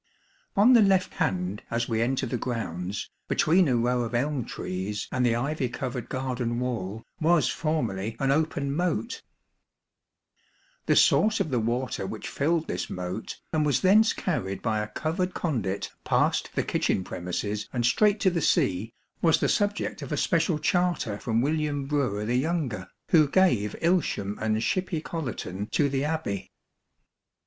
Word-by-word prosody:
On 215 +6 +6
the 235 - +7
left 195 -2 +3
hand 95 +2 -1
as 115 0 -1
we 115 -1 0
enter 130 +3 0
the 125 - -3
grounds, 100 -6 -4 0.2
between 175 +2 +3
a 130 - +2
row 120 +1 +1
of 120 0 -3
elm 135 0 0
trees 95 +3 -4
and 125 - 0
the 120 -2 +3
ivy 135 +1 -1
covered 125 0 -4
garden 125 -2 -2
wall, 115 -4 -3 0.2
was 155 -5 +3
formerly 115 - -2
an 135 -1 +2
open 145 -2 0
moat. 180 - -1 1.7
The - - +4
source 215 +1 +4
of 155 - -1
the 125 - +2
water 120 -2 -2
which 110 +2 -6
filled 160 +3 0
this 90 0 -3
moat, 90 +4 -5
and 155 -1 +2
was 145 -4 +2
thence 215 +4 +5
carried 95 - -3
by 110 -1 +1
a 105 - -2
covered 165 +10 -2
conduit 110 - -2
past - - +1
the - - +1
kitchen 95 - 0
premises 100 +4 -4
and 120 -2 -1
straight 205 - +3
to 190 - +4
the 170 -1 -1
sea, 105 -2 +1 0.3
was 165 -1 +4
the - - +2
subject 205 -5 0
of 140 - -7
a 150 - 0
special 165 +1 +2
charter 175 - 0
from 115 -1 0
William 145 0 0
Brewer 135 -8 -1
the 120 +3 +1
younger, 130 - -1 0.2
who 155 -3 +6
gave 135 - +2
Ilsham 165 - +1
and 110 -1 +1
Shiphay 180 -1 -1
Collaton 105 - -4
to 145 -2 +3
the 135 +1 0
Abbey. 155 - -3
130 Hz, 160 wpm, -27 LUFS, 110-160 Hz, 1.7 s, the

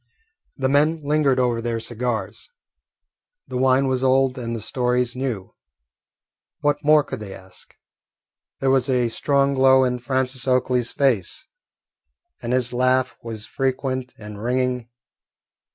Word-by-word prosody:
The 130 -2 0
men 150 +4 +3
lingered 145 -2 +2
over 120 -2 +1
their 115 -1 -2
cigars. 115 -3 -4 1.0
The 125 - -4
wine 130 +1 +3
was 130 -1 0
old 130 0 +3
and 120 -2 -4
the - - -4
stories 125 +2 0
new. 125 -8 -4 1.1
What 145 0 0
more 150 0 +5
could - - -6
they 100 -3 -8
ask? 95 0 -15 0.9
There 135 -1 +2
was 135 0 +2
a 125 -2 +2
strong 140 +3 +1
glow 130 0 +5
in 125 -1 0
Francis 130 +1 -1
Oakley's 125 -1 +1
face, 120 -11 0 1.0
and 120 - -4
his 125 -1 +1
laugh 130 +1 +1
was 110 -2 -6
frequent 130 +1 -2
and 105 -1 -9
ringing. 125 -1 -1
130 Hz, 135 wpm, -22 LUFS, 120-135 Hz, 1.1 s, more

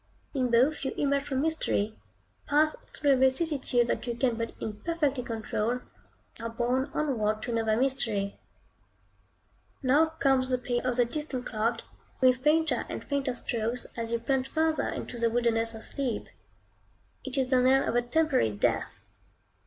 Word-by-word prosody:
In 255 -3 0
both 255 +7 +3
you 265 - -3
emerge 280 -1 +1
from 265 -2 -1
mystery, 280 -9 0 0.5
pass 305 +1 +3 0.2
through 290 -2 +1
a - - +5
vicissitude 265 -2 +2
that 235 0 -2
you 240 - -1
can 245 -1 +1
but 230 0 -4
imperfectly 280 +4 -1
control, 225 0 -2
and 250 - -4 0.6
are 230 0 -4
borne 245 +4 0
onward 215 -8 0
to 240 - -3
another 225 -1 +1
mystery. 225 -6 0 1.4
Now 285 +5 +4
comes 270 -5 +1
the 255 - +2
peal 245 -1 -2
of 250 - +1
the 245 -1 +4
distant 260 -1 -4
clock, 230 +1 -1 0.4
with 255 -1 +4
fainter 300 -3 +2
and - - -5
fainter 275 -3 -1
strokes 235 0 +1
as 230 -1 -4
you 235 - +2
plunge 260 +3 0
further 315 +1 0
into 240 - -5
the 230 0 +2
wilderness 230 -1 +1
of 220 - -9
sleep. 265 -5 -3 0.9
It - - -5
is 260 -1 0
the 255 -1 +5
knell 265 +2 +4
of - - 0
a 240 - +3
temporary 265 - +2
death. 100 - 0
255 Hz, 160 wpm, -28 LUFS, 230-280 Hz, 1.4 s, a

